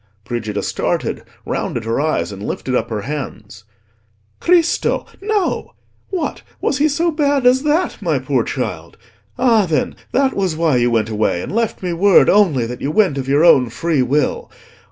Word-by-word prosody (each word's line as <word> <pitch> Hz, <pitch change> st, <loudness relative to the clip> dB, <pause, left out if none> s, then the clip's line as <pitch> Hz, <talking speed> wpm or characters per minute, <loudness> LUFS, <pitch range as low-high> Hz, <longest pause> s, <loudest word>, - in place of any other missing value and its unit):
Brigida 110 Hz, -4 st, -3 dB
started, -, -, -2 dB, 0.2 s
rounded 115 Hz, -2 st, -3 dB
her 115 Hz, +4 st, 0 dB
eyes, 105 Hz, -, -1 dB
and 100 Hz, -1 st, -9 dB
lifted 130 Hz, +4 st, -4 dB
up -, -, 0 dB
her 110 Hz, -2 st, -3 dB
hands. 105 Hz, -6 st, -7 dB, 0.7 s
"Cristo! 345 Hz, -1 st, +2 dB, 0.2 s
no. 415 Hz, -2 st, -1 dB, 0.3 s
What! 370 Hz, -4 st, -3 dB, 0.2 s
was 280 Hz, -, -1 dB
he 300 Hz, -, +4 dB
so 330 Hz, +4 st, +1 dB
bad 285 Hz, -4 st, +1 dB
as 255 Hz, +1 st, +5 dB
that, 300 Hz, +5 st, 0 dB
my -, -, 0 dB
poor -, -, 0 dB
child? -, -, -5 dB, 0.4 s
Ah, 230 Hz, -6 st, +3 dB
then, 155 Hz, -2 st, -1 dB, 0.2 s
that 270 Hz, 0 st, +2 dB
was 190 Hz, -5 st, 0 dB
why 160 Hz, -5 st, +2 dB
you 120 Hz, 0 st, +2 dB
went 115 Hz, -2 st, 0 dB
away, 105 Hz, -5 st, 0 dB
and -, -, -6 dB
left 225 Hz, -1 st, -1 dB
me 180 Hz, -1 st, -1 dB
word 195 Hz, +4 st, +5 dB
only 170 Hz, -, +3 dB
that 120 Hz, +1 st, -7 dB
you 140 Hz, -, -1 dB
went 175 Hz, -5 st, +2 dB
of 130 Hz, -, -5 dB
your 145 Hz, +4 st, +4 dB
own 130 Hz, -8 st, +5 dB
free 155 Hz, +4 st, 0 dB
will. 140 Hz, +4 st, 0 dB
160 Hz, 175 wpm, -18 LUFS, -, 0.7 s, as